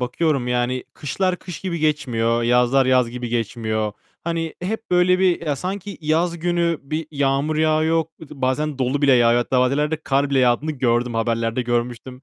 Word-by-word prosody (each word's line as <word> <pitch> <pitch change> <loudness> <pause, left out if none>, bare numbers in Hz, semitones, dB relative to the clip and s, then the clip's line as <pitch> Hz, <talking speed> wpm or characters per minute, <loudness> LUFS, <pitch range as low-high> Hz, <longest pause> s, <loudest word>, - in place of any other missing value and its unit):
bakıyorum, 130 +1 0
yani. 125 +1 -1
Kışlar 180 +6 -1
kış 180 -1 -9
gibi 180 -3 -3
geçmiyor. 120 -7 0
Yazlar 125 +3 +3
yaz 130 -2 +3
gibi 125 0 -5
geçmiyor. 110 -2 -2 0.3
Hani, 165 -1 -2
hep 220 +4 -4
böyle 180 +1 +4
bir 180 -3 +1
ya, 145 -2 0
sanki 195 +5 -5
yaz 165 +2 0
günü 170 -1 0
bir 155 +3 -4
yağmur 140 +1 0
yağıyor. 155 +1 +2 0.2
Iıı, 160 - -11
bazen 140 +3 0
dolu 135 +3 0
bile 140 -1 +5
yağıyor 120 -1 +4
hatta 125 +1 +1
bazı 125 +1 +2
yerlerde 150 +2 0
kar 140 0 +1
bile 135 - +2
yağdığını 125 +5 +2
gördüm. 120 -3 0
Haberlerde 115 +1 0
görmüştüm. 120 +2 -3
135 Hz, 170 wpm, -21 LUFS, 120-160 Hz, 0.3 s, bile